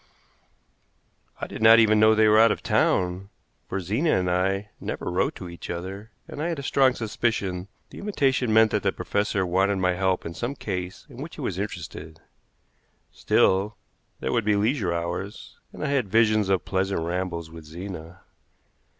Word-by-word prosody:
I - - -3
did - - -8
not 110 +1 +8
even 110 -2 +5
know 110 0 +6
they 110 0 +5
were 105 0 +6
out 115 -1 +6
of - - -3
town, 95 -3 +1 0.4
for 95 - -2
Zena 110 - +1
and 90 -1 0
I 95 +3 0
never - - -4
wrote - - 0
to 90 - -8
each 85 0 -9
other, 95 +5 -6 0.2
and 145 - -7
I 165 - -1
had 165 - -2
a 140 - -6
strong 135 -1 +3
suspicion 105 -5 -2 0.2
the - - -10
invitation 135 - 0
meant 110 0 +5
that - - +1
the - - +1
professor 100 -2 -1
wanted 95 +3 +2
my 90 -1 +1
help 95 0 0
in 85 - -5
some 120 +9 -4
case 90 -6 -5
in - - -14
which - - -7
he - - -8
was - - -3
interested. 80 +1 -6 0.9
Still, 100 +3 +2 0.4
there - - -1
would 115 -2 +1
be 105 0 +2
leisure 105 -2 +1
hours, 85 +4 -5
and - - -8
I 150 - -1
had 130 -8 0
visions 110 -1 +3
of 95 -2 +1
pleasant 95 -1 -1
rambles 85 -2 -3
with 80 -1 -11
Zena. 85 +1 -8
100 Hz, 180 wpm, -25 LUFS, 90-110 Hz, 0.9 s, not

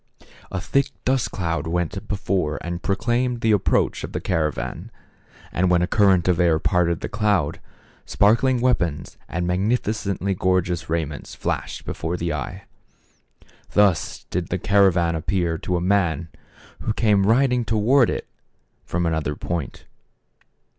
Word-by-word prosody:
A 95 - -2
thick 140 +9 +1 0.2
dust 130 -2 +1
cloud 85 -2 -2
went 90 +5 -2
before 95 -6 -1
and 85 +1 -4
proclaimed 120 +5 0
the 110 - +3
approach 105 -3 +1
of - - -6
the - - -1
cara 80 -3 0
van; - - -6 0.6
and 90 +1 +1
when 90 -1 +3
a - - +1
current 95 -5 +3
of 90 -2 +2
air 85 -3 +4
parted 85 0 +1
the - - -3
cloud, 100 -8 0 0.4
sparkling 120 +5 +3
weapons 85 - 0
and 90 0 -2
magnificently 100 0 0
gorgeous 90 -2 0
raiments 80 -3 -3
flashed - - -3
before 85 +2 -3
the 85 -1 -2
eye. 70 -4 -5 1.1
Thus 100 -5 +2
did 90 -1 -2
the 95 - -1
caravan 95 -3 +3
appear 85 0 -1
to 90 +1 -1
a - - -2
man 90 -4 +1 0.5
who 110 - -2
came 105 -3 +2
riding 125 +1 +3
towards 115 +4 +3
it - - -3 0.6
from 85 +1 -2
another 80 -2 -1
point. 85 -4 -5
90 Hz, 140 wpm, -23 LUFS, 85-105 Hz, 1.1 s, air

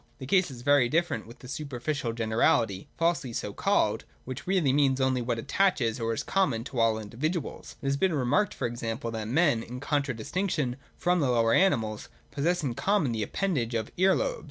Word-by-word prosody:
The 130 - -7
case 185 +5 +3
is 125 -3 -10
very 145 -3 +4
different 165 -3 0
with 120 +2 -12
that 125 - -12
superficial 140 -2 -3
generality 110 -2 +1
falsely 165 -7 0
so - - -3
called, - - +1 0.2
which 130 +5 -7
really 180 -8 +2
means 135 -2 +3
only 130 -1 +2
what 120 -1 -1
attaches, 125 - +1
or 115 0 -1
is 115 - -2
common, 145 -13 +1
to 130 -1 -5
all 115 -1 +4
the 110 - -5
individuals. 150 - -4
It - - -6
has 140 0 +1
been 185 0 +2
remarked, 145 +10 +1
for - - -3
example, 115 0 -3
that 110 -1 -4
men, 145 -2 +3
in 125 +2 -7
contradistinction 145 - -1 0.2
from 180 0 +2
the 140 -5 +1
lower 115 -2 +3
animals, 115 - +2 0.2
possess 170 +4 0
in 130 -4 -1
common 190 - +1
the 110 -1 -2
appendage 125 - -1
of 110 -1 -2
ear 190 +1 +4
lobes. - - -1
130 Hz, 195 wpm, -28 LUFS, 115-165 Hz, 0.2 s, very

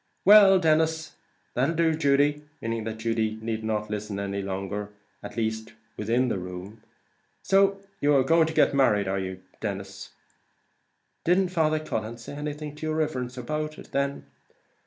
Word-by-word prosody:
"Well, 200 -1 +9
Denis 160 -1 +1 0.4
that'll 135 +7 +1
do, 165 0 +3
Judy," 145 -1 +2 0.2
meaning 115 -1 -3
that 110 0 -4
Judy 110 -1 -1
need 110 0 -3
not 105 -1 -2
listen 105 -1 -4
any 100 0 -3
longer, 100 +1 -4 0.3
at - - -9
any 115 -1 +2
rate 110 +1 -9 0.2
within 120 +4 +1
the 100 - -1
room 90 +4 -8 0.6
"so 195 +1 +3 0.2
you 145 0 +3
are 135 - +5
going 165 +3 +4
to 160 - -4
get - - +4
married, 105 -8 +3
are 95 +1 0
you?" 95 0 -5 0.2
"Didn't 105 - -5
Father 155 -3 +1
Cullen 115 -6 -4
say 120 +4 -9
anything 150 0 -5
to 155 - -4
your 155 - -1
riverence 130 -5 -2
about 150 +5 -3
it, - - -13
then?" 140 - -1
125 Hz, 155 wpm, -26 LUFS, 105-155 Hz, 0.6 s, Well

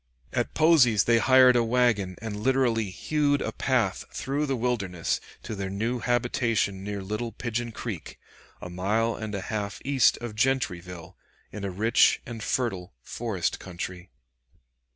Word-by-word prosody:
At 120 - -1
Posey's 140 - +5
they 115 -1 +4
hired 130 0 +6
a 120 - +4
wagon 115 -6 +1
and 110 -2 -4
literally 115 -2 +1
hewed 145 +9 0
a - - -2
path 120 -8 0
through 145 +3 -2
the 135 - 0
wilderness 105 -8 -1 0.2
to - - -5
their 100 -2 -4
new 115 +6 -2
habitation 115 -5 0
near 100 -1 -4
Little 105 +4 -3
Pigeon 120 0 -3
Creek, 110 -5 -6 0.5
a - - -5
mile 105 +6 0
and 110 -2 -5
a 100 - -3
half 100 0 -4
east 135 -4 +4
of 120 -2 -6
Gentryville, 90 -8 -2 0.4
in 105 - -7
a 100 - -2
rich 110 +5 +3
and 115 -2 -7
fertile 100 -6 -2
forest 110 -7 -3
country. 90 0 -7
115 Hz, 150 wpm, -27 LUFS, 100-125 Hz, 0.5 s, hired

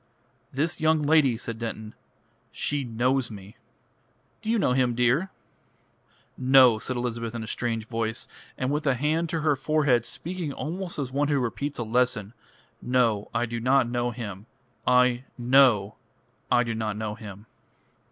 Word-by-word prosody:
"This 160 +6 -1
young 155 -1 +3
lady," 145 -5 +4
said 115 -1 -5
Denton, 110 -2 -5 0.6
"she 145 -1 -1
knows 125 +2 0
me." 100 -1 -11 0.9
"Do 220 - -5
you 230 - +3
know 195 - +2
him, 125 -2 +1
dear?" 125 +10 +2 1.1
"No," 130 -3 +6
said 130 +3 -3
Elizabeth 115 -1 -3
in 115 - -4
a - - -8
strange 115 -1 -2
voice, 115 +1 -2 0.3
and 130 +1 -1
with 150 +1 -1
a 135 - +3
hand 155 +5 0
to 165 -1 -2
her 150 -2 +2
forehead, 135 -3 +2
speaking 170 +3 -5
almost 175 +5 -5
as 135 -3 -3
one 145 +2 +1
who 145 -1 +1
repeats 135 +4 -3
a 120 - -2
lesson. 115 -2 0 0.5
"No, 120 -5 +1
I 120 +1 0
do 115 0 -4
not 130 +1 +3
know 120 0 -1
him. 110 -4 -7 0.4
I 125 0 +4
know 120 -5 +4 0.5
I 120 - +4
do 115 -1 -3
not 110 -2 -3
know 110 -1 -3
him." 105 -2 -10
125 Hz, 160 wpm, -26 LUFS, 115-140 Hz, 1.1 s, No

